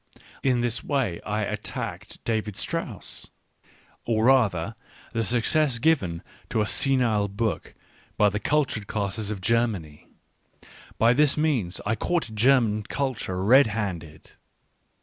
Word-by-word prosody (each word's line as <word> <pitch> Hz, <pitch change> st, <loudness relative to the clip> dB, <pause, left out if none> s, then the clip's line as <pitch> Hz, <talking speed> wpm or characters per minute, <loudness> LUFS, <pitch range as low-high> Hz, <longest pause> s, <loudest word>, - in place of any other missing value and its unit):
In 125 Hz, -3 st, +2 dB
this 120 Hz, -1 st, -1 dB
way 130 Hz, -, -1 dB
I 105 Hz, +2 st, -1 dB
attacked -, -, -5 dB
David 110 Hz, -3 st, -2 dB
Strauss, -, -, -4 dB, 0.7 s
or 110 Hz, -1 st, +1 dB
rather 115 Hz, -8 st, +3 dB, 0.4 s
the 115 Hz, -1 st, 0 dB
success 120 Hz, +5 st, +1 dB
given 115 Hz, -, +1 dB, 0.3 s
to -, -, 0 dB
a -, -, +1 dB
senile 115 Hz, -5 st, +2 dB
book 100 Hz, +2 st, -3 dB, 0.4 s
by 105 Hz, -, +5 dB
the 105 Hz, +1 st, -3 dB
cultured 130 Hz, -7 st, 0 dB
classes 105 Hz, 0 st, -2 dB
of 105 Hz, -3 st, -4 dB
Germany 100 Hz, -8 st, -1 dB, 0.5 s
— -, -, -25 dB, 0.3 s
by 115 Hz, +2 st, +5 dB
this 150 Hz, +2 st, +3 dB
means 135 Hz, -, 0 dB
I 110 Hz, -, +1 dB
caught 165 Hz, -5 st, -1 dB
German 110 Hz, -2 st, +3 dB
culture 110 Hz, -6 st, -3 dB
red 130 Hz, +5 st, +6 dB
handed. 85 Hz, -8 st, -5 dB
110 Hz, 130 wpm, -25 LUFS, 100-130 Hz, 0.7 s, red